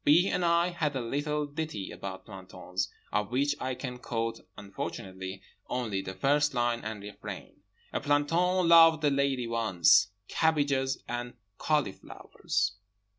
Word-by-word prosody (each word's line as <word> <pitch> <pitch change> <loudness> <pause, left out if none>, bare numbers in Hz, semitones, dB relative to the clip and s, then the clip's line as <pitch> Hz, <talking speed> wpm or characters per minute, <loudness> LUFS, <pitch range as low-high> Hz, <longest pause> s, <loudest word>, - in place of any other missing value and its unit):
B. 170 +6 +5
and 180 - 0
I 170 +1 +3
had 160 -5 -2
a - - 0
little 145 +5 -1
ditty 145 -8 -5
about 95 -1 -7
plantons, 95 -1 -5 0.2
of 105 -1 0
which 140 +4 +1
I 130 0 -2
can 125 -1 -6
quote 115 -2 -3 0.2
(unfortunately) 95 -1 -6 0.3
only 110 -6 -1
the 95 0 -7
first 145 +7 +2
line 120 -1 +1
and 110 -2 -5
refrain: 100 -1 -9 0.3
"A - - -1
planton 170 +5 +2
loved 165 -2 +7
a 145 - +4
lady 140 -3 +1
once 110 -9 +4 0.2
(Cabbages 140 -4 +1
and 120 0 -4 0.2
cauliflowers!)" 100 -6 -1
130 Hz, 135 wpm, -29 LUFS, 105-150 Hz, 0.3 s, loved